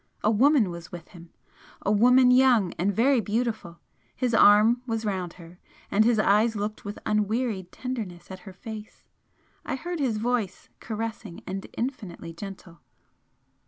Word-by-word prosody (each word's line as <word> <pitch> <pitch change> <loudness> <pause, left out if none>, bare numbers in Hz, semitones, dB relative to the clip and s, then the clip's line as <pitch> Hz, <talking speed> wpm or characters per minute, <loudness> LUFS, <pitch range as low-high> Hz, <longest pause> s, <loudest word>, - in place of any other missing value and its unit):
A 215 - +3
woman 240 - +4
was 170 0 -9
with 175 -2 -9
him 170 -3 -14 0.5
a 205 - +1
woman 250 +4 +5
young 250 -7 +4
and 190 +4 +2
very 245 +4 +3
beautiful 215 -5 -3 0.4
his 250 -2 -1
arm 220 +3 +6
was 225 -1 -2
round 185 -4 -3
her, 175 0 -14 0.3
and 210 +2 +4
his 230 0 +3
eyes 215 +2 +3
looked 210 +1 -4
with 205 0 -6
unwearied 210 -2 -1
tenderness 215 -10 -6
at 190 - -8
her - - -12
face. 215 +2 -10 0.6
I - - -3
heard 345 +5 -5
his 250 -6 0
voice 230 -3 -2
caressing, 220 -4 -6
and 195 +1 -5
infinitely 210 -10 -5
gentle. 185 -1 -10
215 Hz, 150 wpm, -26 LUFS, 190-240 Hz, 0.6 s, arm